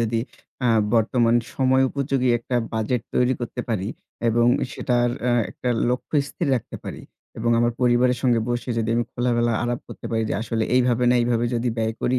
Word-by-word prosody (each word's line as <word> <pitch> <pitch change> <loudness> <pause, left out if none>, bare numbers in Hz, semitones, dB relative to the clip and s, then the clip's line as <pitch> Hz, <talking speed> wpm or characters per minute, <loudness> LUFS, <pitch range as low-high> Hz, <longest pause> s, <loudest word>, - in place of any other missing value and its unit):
যদি 115 0 0 0.4
অ্যা 125 -2 +2 0.2
বর্তমান 115 +1 +3 0.2
সময় 130 -1 +3
উপযোগী 135 -2 0
একটা 125 +1 -3 0.2
বাজেট 110 +2 -1
তৈরি 125 +1 +3
করতে 120 +1 -4
পারি 105 -4 -1 0.4
এবং 120 +1 +3 0.3
সেটার 120 -1 +1
অ্যা 125 0 +1 0.2
একটা 125 - -5 0.2
লক্ষ্য 125 +4 -2
স্থির 165 +1 -3
রাখতে 120 - -4
পারি - - -7 0.4
এবং 115 +1 0
আমার 120 0 +2
পরিবারের 125 0 +3
সঙ্গে 120 -3 +3
বসে 120 +1 -2
যদি 115 0 -1
আমি 120 - +1
খোলাবেলা 120 -1 +1
আরাপ 120 0 -2
করতে - - -8
পারি 115 -1 0
যে - - 0
আসলে 115 -1 -1
এইভাবে 125 -1 +3
না - - +4
এইভাবে 120 0 +1
যদি 120 +1 0
ব্যয় 110 0 0
করি 125 +1 +1
120 Hz, 180 wpm, -23 LUFS, 115-125 Hz, 0.4 s, না